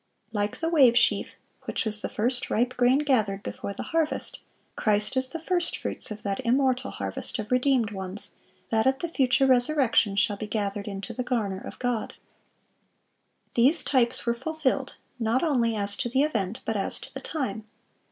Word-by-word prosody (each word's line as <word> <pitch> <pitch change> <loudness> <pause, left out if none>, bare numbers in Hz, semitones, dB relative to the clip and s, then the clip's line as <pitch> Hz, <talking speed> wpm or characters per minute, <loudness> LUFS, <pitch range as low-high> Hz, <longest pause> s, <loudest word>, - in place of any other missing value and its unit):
(652) - - -12
Like 205 0 -1
the 330 +1 -1
wave 250 -5 +6
sheaf, 210 -4 +3 0.4
which - - -2
was 215 -1 -1
the - - -3
first 245 +3 0
ripe 245 +3 +1
grain 250 +2 +4
gathered 210 -8 +1
before - - -5
the 200 - -6
harvest, 325 -2 -1 0.4
Christ 210 +2 +1
is 260 0 +1
the 330 +3 -6
first 350 0 0
fruits - - -4
of 215 -1 -7
that 195 -1 -2
immortal 255 - +2
harvest 100 -1 -4
of 215 +1 -6
redeemed 250 -3 +2
ones 190 0 -5 0.4
that 220 +2 +2
at 265 +1 +1
the 340 - -2
future 270 -3 +3
resurrection 250 -5 +3
shall 205 0 +2
be 215 - -5
gathered 205 -1 -2
into 200 +3 -5
the 250 - -3
garner 220 -7 -2
of - - -9
God. 245 -3 -2 1.4
These 265 +8 +5
types 245 -4 +2
were 235 - +2
fulfilled, 275 0 -2 0.2
not 230 +4 +1
only 240 -8 +2
as 200 -1 +1
to 240 - -2
the 265 +3 +2
event, 225 -6 -2
but 225 - -1
as 195 - 0
to - - -10
the - - -6
time. 220 -9 -4
235 Hz, 180 wpm, -26 LUFS, 210-265 Hz, 1.4 s, wave